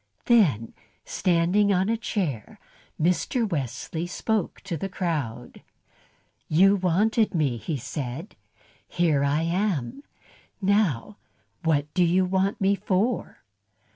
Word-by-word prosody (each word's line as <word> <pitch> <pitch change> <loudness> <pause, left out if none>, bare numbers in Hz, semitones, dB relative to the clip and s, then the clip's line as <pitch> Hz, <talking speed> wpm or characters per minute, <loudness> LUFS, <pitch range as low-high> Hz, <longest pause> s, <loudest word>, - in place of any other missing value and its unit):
Then, 155 - +3 0.3
standing 180 +4 +2
on 190 0 +2
a 225 - +1
chair, 180 - -3 0.4
Mr. 180 +8 +1
Wesley 160 - -3
spoke 215 +2 -2
to 195 -4 -4
the 195 +5 -4
crowd. 145 -11 -4 0.9
"You 195 +6 +5
wanted 205 +4 +1
me," 140 -7 +1
he 145 +6 -3
said. 135 - -6 0.5
"Here 160 -5 +1
I 145 +3 +1
am. 175 - -1 0.6
Now 200 - +1 0.4
what 150 -3 0
do 180 - +3
you 180 +2 +3
want 190 +2 0
me 195 +1 +3
for?" 200 +4 -1
180 Hz, 110 wpm, -25 LUFS, 150-200 Hz, 0.9 s, You